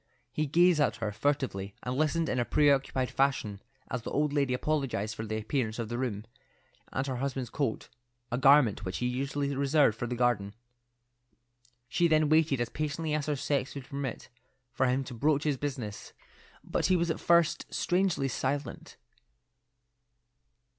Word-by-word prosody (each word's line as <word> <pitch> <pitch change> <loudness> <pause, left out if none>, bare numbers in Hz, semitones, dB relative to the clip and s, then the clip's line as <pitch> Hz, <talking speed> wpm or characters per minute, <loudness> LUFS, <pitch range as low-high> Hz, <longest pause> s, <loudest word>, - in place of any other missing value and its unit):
He 155 +3 0
gazed 170 +2 +4
at 115 -7 +2
her 110 -2 -3
furtively, 110 -5 -1
and 125 +1 -2
listened 155 +3 +1
in 125 - 0
a - - +3
preoccupied 135 -2 +2
fashion 130 -7 0 0.3
as 125 - -2
the - - -6
old 150 0 0
lady 140 -3 +1
apologized 125 -6 -1
for 110 - -6
the 110 0 -2
appearance 110 0 -2
of 115 -2 -4
the 120 - -3
room, 110 -5 -3 0.7
and 130 - -1
her 130 -2 -3
husband's 130 -2 -3
coat, 140 -7 -2 0.4
a 125 - 0
garment 135 -7 +5
which 95 -1 -3
he 125 - -2
usually 140 +3 -1
reserved 140 -3 +3
for 120 +1 -4
the 125 - -3
garden. 115 -5 0 1.3
She 170 +7 +2
then 155 -2 +3
waited 155 -4 +3
as 120 - -1
patiently 155 +1 -3
as 150 -1 -1
her 150 - +1
sex 140 0 -1
would 140 -2 -6
permit, 140 -4 -5 0.4
for 130 +2 +2
him 130 +2 +1
to 130 - -8
broach 145 +4 +1
his 150 -3 0
business, 125 -7 -5 0.5
but - - 0
he 185 - +4
was 170 -1 +1
at - - -3
first 170 -2 +2
strangely 180 -6 +1
silent. 135 +2 -3
135 Hz, 165 wpm, -30 LUFS, 120-150 Hz, 1.3 s, garment